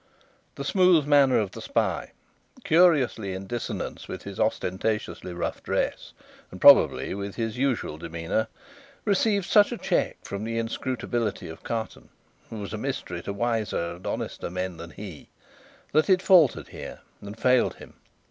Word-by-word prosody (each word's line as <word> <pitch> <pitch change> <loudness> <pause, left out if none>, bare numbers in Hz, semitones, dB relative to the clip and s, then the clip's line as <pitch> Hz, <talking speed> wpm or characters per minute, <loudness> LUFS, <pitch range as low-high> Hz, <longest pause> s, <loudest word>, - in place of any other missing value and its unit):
The 140 - -5
smooth 180 -1 +4
manner 140 -3 +5
of 100 -4 0
the - - -9
spy, - - -1 0.5
curiously 145 - +3
in 95 +1 -6
dissonance 120 +3 -5
with - - -7
his - - -8
ostentatiously 95 -2 -1
rough 85 - -4
dress, - - -2 0.4
and - - -10
probably - - +6
with 100 0 -5
his 115 -2 -2
usual 125 - -1
demeanour, 85 +6 -2 0.6
received 200 -1 +2
such 205 +4 +5
a 240 - -3
check - - 0
from 100 +1 -5
the 115 +1 -3
inscrutability 115 -1 -2
of 80 - -10
Carton, 115 -1 -5 0.4
who 110 - -7
was 105 0 -6
a 110 - -3
mystery 105 -9 -4
to 100 - -5
wiser 105 -5 -1
and 85 +2 -9
honester - - -4
men 90 0 -4
than 85 0 -8
he, 90 -5 -10 0.6
that 155 +5 +3
it 185 -1 +4
faltered 175 -9 +5
here - - -9 0.2
and 100 +2 -9
failed 125 +1 +3
him. - - -13
110 Hz, 155 wpm, -26 LUFS, 95-140 Hz, 0.6 s, probably